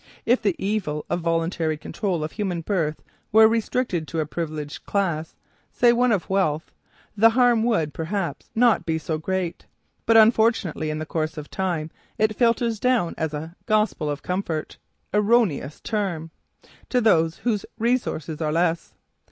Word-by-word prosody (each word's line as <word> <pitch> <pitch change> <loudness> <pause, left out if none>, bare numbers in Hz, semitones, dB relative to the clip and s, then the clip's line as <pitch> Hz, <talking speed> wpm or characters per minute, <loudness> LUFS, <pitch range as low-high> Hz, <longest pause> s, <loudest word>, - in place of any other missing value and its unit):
If 245 +3 +3
the 200 -6 +1
evil 190 -8 -2
of - - +1
voluntary 165 -1 0
control 175 +1 -3
of 155 - -4
human 185 -5 -2
birth 160 -4 -1 0.3
were 220 +1 +8
restricted 225 -6 -1
to 165 - -3
a 155 - 0
privileged 155 -2 -5
class, 170 -6 -1 0.4
say 240 -1 +4
one 245 +1 +3
of 200 -6 0
wealth, 170 -5 0 0.4
the 225 +2 +6
harm 245 0 +4
done 225 - +1
would, 165 -11 +1
perhaps, 165 -2 -3
not 235 -4 +4
be 160 -1 -1
so 160 0 -3
great. 185 +1 -3 0.4
But, 225 0 +6
unfortunately, 220 -8 +3
in 155 - -2
the 155 - -4
course 155 0 -3
of 150 -1 -8
time 170 -5 -2 0.3
it 215 -1 +1
filters 230 -1 +1
down 245 -9 +1
as 160 -1 -2
a 160 +3 -6
"gospel 215 -8 +1
of 145 0 -4
comfort" 180 -4 -3 0.4
erroneous 210 - +2
term! 185 -7 -3 0.6
to 250 - +2
those 165 -8 +3
whose 215 -4 +1
resources 220 - -1
are 155 -1 0
less. 165 +1 0
180 Hz, 160 wpm, -24 LUFS, 160-220 Hz, 0.6 s, were